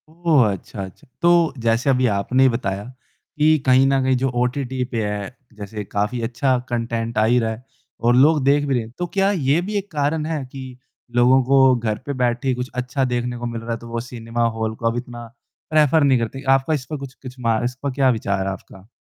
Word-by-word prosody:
ओह! 160 -7 +3
अच्छा, 95 +1 -6
अच्छा। 95 -1 -12
तो 170 -1 +4
जैसे 115 +4 +1
अभी 130 -1 +3
आपने 110 +5 +1
ही 135 - +6
बताया, 100 -5 -2 0.5
कि 155 +1 +4
कहीं 130 0 +5
न 135 0 +2
कहीं 130 0 +2
जो 135 +1 0
ओटीटी 125 +1 -1
पे 115 -3 -3
है, 105 +3 -4 0.2
जैसे 105 0 -7
काफ़ी 105 +5 -2
अच्छा 125 +3 0
कंटेंट 115 -1 -2
आ 110 - +4
ही 120 +2 +3
रहा 115 -1 -1
है 110 +3 -8 0.4
और 120 +1 +3
लोग 145 +3 +4
देख 145 +1 +3
भी 140 - 0
रहे 120 -3 0
हैं। 110 - -12
तो 175 - -2
क्या 195 0 +2
ये 155 -3 +1
भी 205 +4 -5
एक 200 0 -5
कारण 150 +1 -1
है 155 -3 -2
कि 130 -2 -9 0.4
लोगों 125 +2 +5
को 135 0 +5
घर 110 -3 -2
पे 145 - -3
बैठे 125 0 -1
ही 130 - +3
कुछ 125 +1 -4
अच्छा 125 +2 -1
देखने 120 -1 -2
को 120 - -5
मिल 115 -1 -4
रहा 115 +1 -6
है 115 - -1
तो 115 - -11
वो 115 0 -3
सिनेमा 120 -1 -4
हॉल 110 0 -2
को 115 - -8
अब 115 - -3
इतना 120 -1 -7 0.4
प्रेफर 155 0 +4
नहीं 135 -3 +4
करते? 120 +4 -4
आपका 135 +3 +3
इस 140 -4 -2
पे 150 - -5
कुछ 135 -2 -8
कुछ 130 -2 -11
मा 115 -2 +1
इस 125 +1 -2
पर 140 - -1
क्या 135 0 +2
विचार 100 -5 -1
है 95 - -1
आपका? 95 +1 -11
125 Hz, 235 wpm, -21 LUFS, 115-140 Hz, 0.5 s, ही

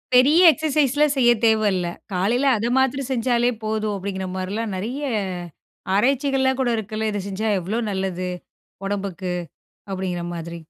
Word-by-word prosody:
பெரிய 290 +8 +6
எக்ஸர்சைஸ்லாம் 295 -1 +2
செய்யத் 240 -3 +4
தேவையில்ல, 205 -5 +2 0.3
காலையில 225 +9 +1
அதை 230 +3 -1
மாத்றம் 265 0 +1
செஞ்சாலே 240 0 +2
போதும், 215 -1 -1
அப்படிங்கிற 190 -1 -4
மாரிலாம் 200 +3 -3
நிறைய 245 +9 -4 0.9
ஆராய்ச்சிகள்லாம் 265 +3 +2
கூட 245 - +1
இருக்குல்ல, 220 +1 -3
இதை 205 -1 -2
செஞ்சா 205 +3 -3
எவ்வளோ 210 +7 -2
நல்லது 190 -1 -2 0.6
உடம்புக்கு 190 -3 -3 0.6
அப்படிங்கிற 185 -2 -3
மாதிரி. 170 0 -6
220 Hz, 125 wpm, -22 LUFS, 190-260 Hz, 0.9 s, பெரிய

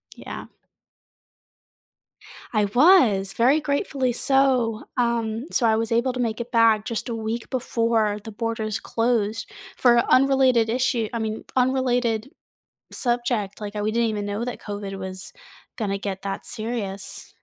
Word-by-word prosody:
Yeah. - - -8 2.1
I 210 -1 +2
was, 225 - +4
very 260 +6 +3
gratefully 280 -3 -1
so. 255 -4 +2
Um, 235 0 0
so 235 - +2
I 220 - +3
was 225 +1 -1
able 240 +2 +1
to 255 - -5
make 230 -1 -1
it 240 +1 -8
back 225 -2 +4
just 230 +1 -3
a - - -2
week 225 +1 -4
before 230 -4 0
the 220 - -8
borders 220 -1 -3
closed 225 -1 -1 0.3
for 240 -2 +5
unrelated 260 -3 +4
issue 245 -2 0
I 230 - -2
mean, 220 0 -3
unrelated 250 -1 +1 0.6
subject, 240 -5 +1
like, 205 0 -6
we 210 +1 -1
didn't 230 0 +1
even 205 -1 -3
know 205 +3 -3
that 245 - -5
COVID 200 -2 -6
was 190 - -5 0.5
gonna 200 -3 -1
get 195 -1 -5
that 195 -1 -4
serious. 205 -3 -3
230 Hz, 140 wpm, -23 LUFS, 210-245 Hz, 2.1 s, for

